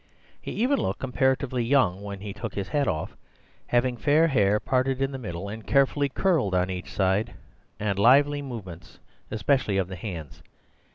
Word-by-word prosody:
He - - -7
even 265 +5 +1
looked - - -2
comparatively 130 -1 0
young 115 -7 +2
when 100 -1 -7
he 100 -1 -6
took 110 0 -6
his 100 -1 -3
hat 145 -2 +1
off, 80 -1 -2 0.5
having 120 0 +1
fair 155 +5 +3
hair 105 -6 +3
parted 130 +2 0
in 135 0 0
the 135 - -6
middle 90 -4 -5
and 110 +2 -7
carefully 140 +2 +2
curled 135 - +1
on 90 +1 +1
each 90 -1 -6
side, 100 +4 0 0.4
and 100 -2 -1
lively 145 +6 +5
movements, 105 -11 -9 0.3
especially 110 -1 +1
of 95 -2 0
the 95 - -6
hands. 85 - -7
115 Hz, 170 wpm, -26 LUFS, 95-135 Hz, 0.5 s, lively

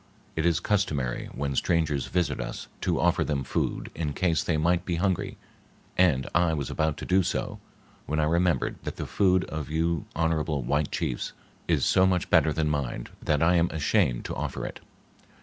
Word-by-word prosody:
It 80 +1 +1
is 85 -4 +2
customary 75 - -1
when 70 0 -3
strangers 75 -4 +1
visit 90 -1 0
us - - -6
to - - 0
offer - - +3
them 70 -3 -1
food 65 - -2
in 75 -3 -3
case 80 -2 +1
they 80 - 0
might 85 +3 +2
be 90 -2 -2
hungry, 95 0 -1 0.6
and 80 -9 +3
I 85 -2 +3
was 70 -3 -3
about 80 -1 0
to - - -6
do 95 +1 +4
so, 90 - -2 0.5
when 75 +2 0
I - - +3
remembered 85 +2 +1
that - - -5
the - - -4
food 95 -2 +3
of 80 -2 -5
you 80 0 0
honorable 80 -3 0
white 70 +4 0
chiefs - - -2 0.3
is - - +2
so 95 0 +4
much 90 -2 0
better 80 - +5
than 75 +1 0
mine 70 -5 -2
that 75 0 +1
I 90 +2 +4
am 85 0 +3
ashamed 65 -5 +1
to - - -3
offer - - -3
it." - - -6
80 Hz, 185 wpm, -27 LUFS, 75-85 Hz, 0.6 s, better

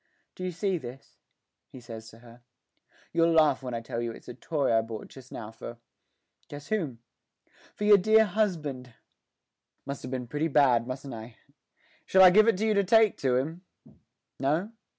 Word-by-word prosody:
'Do 185 - -8
you 185 - -2
see 185 +1 -1
this?' 125 0 -11 0.5
he 130 - -11
says 115 -2 -10
to 110 - -16
her. 120 +1 -17 0.7
'You'll 165 0 +3
laugh 155 -4 +4
when 125 -2 -5
I 115 - -4
tell 115 0 -5
you 120 0 -3
it's - - -13
a - - -7
toy 145 -2 -1
I 110 - +4
bought 115 -1 -8
just 130 -1 -14
now 110 -1 -7
for 115 +1 -9 0.7
guess 145 0 -10
whom 150 - -3 0.7
for - - -5
your 205 -1 +7
dear 220 +3 +5
husband! 155 - -2 0.9
Must 140 0 -6
have 125 - -7
been 130 -1 -4
pretty 150 +6 -2
bad, 130 -6 +3
mustn't 130 +1 -6
I? 110 +1 -9 0.7
Shall 190 0 +6
I 185 - +9
give 215 +4 +5
it 230 - +3
to 215 - -1
you 220 - +2
to 200 -1 +2
take 220 +2 +4
to 130 -2 +1
him 160 +7 -2 0.8
no? 155 +10 0
140 Hz, 185 wpm, -28 LUFS, 120-185 Hz, 0.9 s, I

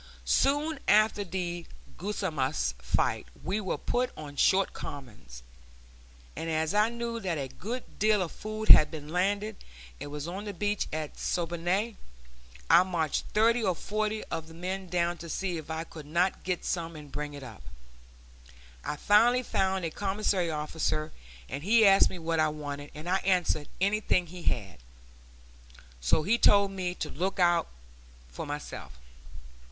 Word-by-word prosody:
Soon 290 - +2
after 210 0 +4
the 175 -2 -4 0.3
Guasimas 160 - -1
fight - - 0 0.2
we 200 +4 -1
were 190 - -2
put 250 +1 0
on 145 -2 -8
short 190 +6 +3
commons; 105 - -9 0.9
and 165 - -4
as 160 +2 0
I 210 +2 +4
knew 235 0 -4
that 180 -6 -2
a 135 -2 -3
good 240 - -7
deal 210 -2 +4
of 170 - -6
food 215 0 -6
had 150 - +10
been 150 -2 -8
landed 200 +4 0 0.4
and 145 - -6
was 150 +1 -5
on 190 +4 -5
the 205 -2 -5
beach 205 +2 0
at 155 -1 -4
Siboney, 175 +6 -1 0.7
I 170 - +8
marched 170 -5 -1
thirty 230 +3 +4
or 185 -5 +1
forty 215 +3 -2
of 160 -1 -5
the 160 - -12
men 185 +2 -4
down 175 0 0
to 170 - -8
see 180 0 -2
if 155 -1 -8
I 160 0 -2
could 155 -3 -11
not 175 +5 +1
get 180 -1 -2
some 170 -2 -2
and 150 -2 -10
bring 145 0 -4
it 140 - -8
up. 115 -5 -10 1.2
I - - -2
finally 235 +9 +4
found 190 -5 0
a 165 - -2
commissary 195 -2 0
officer, 155 0 -2 0.4
and 140 +2 -5
he 220 +4 +5
asked 195 0 +7
me 185 - -7
what 165 -1 -1
I 155 0 +4
wanted, 145 -1 -6
and 155 +3 -8
I 185 +1 +3
answered, 180 -6 +1
anything 200 -2 +2
he 175 +1 -10
had. 95 - -2 1.2
So 65 - +2
he 230 +7 +2
told 200 -1 +5
me 180 -2 -3
to - - -4
look 185 +6 -1
about 175 -2 +3 0.6
for - - -6
myself. 145 - -6
180 Hz, 160 wpm, -29 LUFS, 155-205 Hz, 1.2 s, had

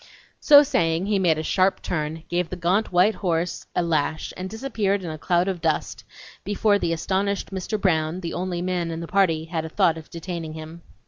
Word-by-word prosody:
So 290 -1 +8
saying, 165 - +1
he 205 -1 +1
made 170 -4 +3
a 155 - -3
sharp 185 +4 +1
turn, 155 -1 -3
gave 175 -1 -1
the - - -4
gaunt 180 +5 0
white 185 +5 +4
horse 175 -3 -2
a 180 - +2
lash 155 -1 -1
and 185 +1 -5
disappeared 215 -4 -1
in 170 - -4
a 155 - -6
cloud 175 +3 +1
of 185 -3 -2
dust, 160 -2 -1 0.4
before 205 +1 +2
the 170 - -1
astonished 195 +5 -1
Mr. 195 +3 -3
Brown, 165 -2 +1
the 170 - -4
only 175 -1 -3
man 180 -2 -1
in 165 0 -4
the 170 - -6
party, 165 -5 +2
had 165 -1 -3
a 160 - -6
thought 160 0 +2
of 160 - -14
detaining 170 -2 -6
him. 160 +2 -9
175 Hz, 205 wpm, -24 LUFS, 160-195 Hz, 0.4 s, So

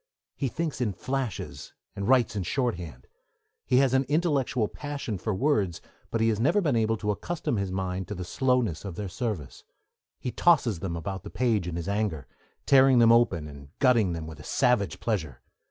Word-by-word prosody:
He 140 - -1
thinks 155 0 -3
in 110 -5 0
flashes, 130 +1 -4 0.2
and 100 - -3
writes 125 -5 +4
in 100 - -1
shorthand. 90 - -3 0.6
He 125 - +3
has 135 -1 +4
an 135 +1 +3
intellectual 140 -6 +1
passion 140 -8 -5
for 110 - -2
words, 100 - +1 0.3
but 115 - -1
he 115 - +4
has 110 -2 0
never 140 - +3
been 150 -10 +1
able 115 0 +1
to 105 0 -1
accustom 155 +2 -2
his 100 -2 -2
mind 95 0 -3
to 105 - -5
the 90 - -5
slowness 125 - 0
of 100 -4 -6
their 105 +2 -4
service; 100 - -4 0.6
he 125 - -3
tosses 135 - +3
them 85 -2 -3
about 95 +3 -4
the - - -9
page 110 -8 0
in 85 - -4
his 85 +1 -4
anger, 100 -8 -1 0.4
tearing 135 -1 +6
them 115 -1 +6
open 95 -10 +3
and 70 -1 -12
gutting 120 -9 +3
them 80 -1 -5
with 80 0 -9
a - - -10
savage 125 - +1
pleasure. 90 -11 -2
110 Hz, 190 wpm, -27 LUFS, 90-130 Hz, 0.6 s, tearing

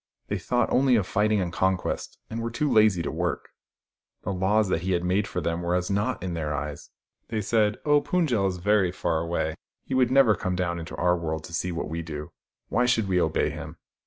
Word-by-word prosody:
They - - -1
thought 120 0 0
only 130 -1 +4
of 105 -5 +2
fighting 105 +2 +2
and 85 -2 -3
conquest, 95 0 -1
and 115 +1 -4
were 115 - -2
too 150 +6 -1
lazy 105 -8 +4
to - - -2
work. - - -2 0.7
The 100 - -2
laws 100 +3 +2
that 85 - 0
he 95 +1 0
had 85 0 0
made 95 +4 +1
for 90 - -3
them 85 +1 -1
were 85 +1 0
as 90 +1 -1
naught 100 +5 -1
in 90 -2 -3
their 75 -3 -2
eyes. 75 0 -5 0.4
They 110 -1 -2
said, 105 0 +2
" - - -37
Oh, 145 -1 +4
Pund 175 -1 0
jel 105 -6 +2
is 90 -1 -2
very 95 0 +2
far 85 -3 -1
away. 85 -1 -1 0.3
He - - -5
will 130 -1 +4
never 130 -3 +5
come 90 -3 -2
down 85 -1 -1
into 80 - -7
our 90 +3 +2
world 80 -2 -3
to 85 - -10
see 90 +2 -1
what 85 - -3
we 80 +2 -3
do. 75 -2 -7 0.4
Why 125 +1 +2
should 115 -4 +2
we 90 -2 +2
obey 80 -1 +1
him - - -8
95 Hz, 235 wpm, -26 LUFS, 85-110 Hz, 0.7 s, never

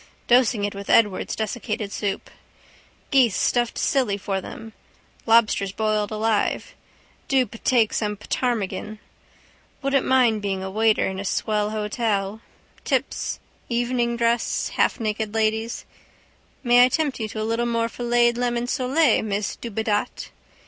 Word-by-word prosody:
Dosing 245 -3 +3
it 205 - -1
with 200 0 -8
Edwards' 205 -4 +3
desiccated 215 -1 -3
soup. 205 -2 -3 0.8
Geese 255 -7 +4
stuffed 240 -1 +1
silly 250 -8 +1
for 195 -1 -3
them. 225 +3 -9 0.5
Lobsters 220 -4 +3
boiled 215 0 0
alive. 215 0 -1 0.5
Do 265 -2 +3
ptake 230 -1 +1
some 210 -1 -1
ptarmigan. 215 -1 -2 0.9
Wouldn't 275 -1 +2
mind 245 -5 +3
being 195 -2 -2
a 190 - -5
waiter 220 +1 +2
in 190 0 -4
a - - -4
swell 210 +1 0
hotel. 215 -1 -2 0.4
Tips, - - -1 0.3
evening 240 0 0
dress, 235 0 0
halfnaked 215 -1 0
ladies. 220 +1 -1 0.8
May 245 -1 +6
I 250 - +5
tempt 290 -1 -1
you 220 - -2
to 215 +1 -5
a - - -2
little 230 +2 0
more 230 -1 0
filleted 240 0 +1
lemon 240 -1 0
sole, 260 +2 +2
miss 205 -1 -2
Dubedat? 220 -2 -3
225 Hz, 130 wpm, -23 LUFS, 210-240 Hz, 0.9 s, May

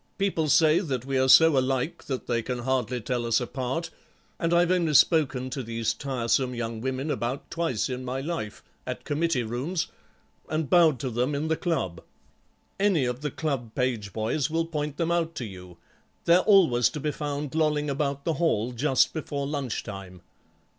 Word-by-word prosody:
People 190 -6 0
say 155 +3 +5
that 135 - -3
we 135 0 -2
are 130 0 +2
so 160 +2 +8
alike 130 +3 -1
that 130 -3 -4
they 120 -1 0
can 125 +2 -3
hardly 125 -1 -1
tell 120 +2 -2
us 115 -1 +2
apart, 130 +6 -3 0.5
and 165 -1 0
I've 175 +1 +4
only 170 -5 +2
spoken 130 -5 +3
to 135 0 -3
these 115 -2 -2
tiresome 125 -1 -1
young 115 -1 -4
women 130 +4 -2
about 125 +3 -3
twice 165 -10 -1
in 130 0 -4
my 130 +1 -3
life, 140 -8 -5 0.2
at - - -4
committee 150 -3 0
rooms, 130 +10 -2 0.6
and 155 -3 -2
bowed 165 -5 +5
to 130 - -2
them 125 +5 0
in 155 +3 -2
the 160 - +2
club. 125 - -2 0.8
Any 195 -9 +3
of 125 +1 -3
the 150 - -2
club 135 -7 -3
page 120 -6 -1
boys 115 +8 -1
will 165 +1 0
point 150 -3 -4
them 170 0 0
out 165 -1 0
to 120 - -4
you; 90 -4 -11 0.5
they're 170 +1 +6
always 170 - +5
to 150 - -6
be 150 +1 -1
found 145 0 -4
lolling 150 -2 +1
about 140 0 -2
the 165 - +1
hall 120 -8 +1
just 130 +2 +2
before 145 -3 -3
lunch 140 -5 -3
time." 95 -4 -9
135 Hz, 180 wpm, -26 LUFS, 120-160 Hz, 0.8 s, so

